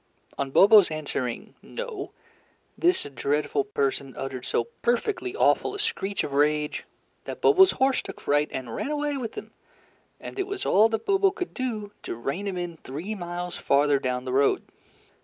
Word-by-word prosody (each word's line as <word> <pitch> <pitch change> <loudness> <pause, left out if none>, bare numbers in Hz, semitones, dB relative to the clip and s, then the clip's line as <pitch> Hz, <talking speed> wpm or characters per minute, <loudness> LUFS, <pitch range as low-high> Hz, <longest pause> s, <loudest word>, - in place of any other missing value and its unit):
On 140 - -2
Bobo's 200 +6 +7
answering 140 -6 -3
"No," 475 -5 -6 0.7
this 355 +2 +3
dreadful 145 +1 -1
person 135 -1 -2
uttered 130 -2 -5
so - - +1 0.2
perfectly 360 - 0
awful 435 - +2
a - - -6
screech 205 - -1
of 140 - -5
rage, 150 +1 +1 0.4
that - - -6
Bobo's 380 -3 +6
horse 265 0 +2
took - - -9
fright 145 +1 +1
and 125 -3 -5
ran - - -3
away 295 -1 -1
with 240 -5 -5
him, - - -8 0.7
and - - -8
it 385 - -1
was 400 -1 -4
all 215 +4 +5
that 225 -1 -2
Bobo 390 0 +4
could 375 -2 -5
do 220 -6 -3
to - - -5
rein 140 - -3
him 190 -2 -3
in 175 -2 -4
three 160 +10 -6
miles 175 -2 -5
farther 140 0 +3
down 125 -1 -2
the 130 - -3
road. 140 +1 +3
180 Hz, 170 wpm, -26 LUFS, -, 0.7 s, Bobo's